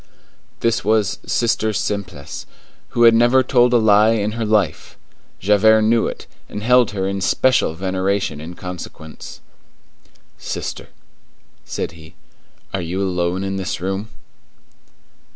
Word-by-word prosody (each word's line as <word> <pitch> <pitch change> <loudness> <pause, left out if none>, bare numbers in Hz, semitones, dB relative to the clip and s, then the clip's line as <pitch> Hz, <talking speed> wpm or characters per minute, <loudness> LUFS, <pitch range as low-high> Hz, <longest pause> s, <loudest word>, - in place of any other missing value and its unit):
This 115 +1 +1
was 105 -1 +1
Sister 110 -2 +1
Simplice, 100 -9 -4 0.4
who 120 - +1
had 115 -1 +8
never 120 +3 +4
told 125 -1 +3
a 120 - +5
lie 110 0 +5
in 105 -1 -1
her 115 0 -3
life. 105 -7 0 0.4
Javert 110 +3 +4
knew 115 +1 +3
it, - - -7 0.2
and 105 - -6
held 125 0 +4
her 95 -2 -2
in 100 0 -3
special 105 -1 +2
veneration 95 -2 -1
in 85 +3 -8
consequence. 90 -4 -9 1.0
"Sister," - - -5 0.8
said - - -4
he, 80 -1 -15 0.6
"are 95 - -1
you 85 +3 -3
alone 90 -1 -1
in 95 0 -3
this 95 -5 -3
room?" 95 +4 -3
100 Hz, 130 wpm, -20 LUFS, 95-115 Hz, 1.0 s, had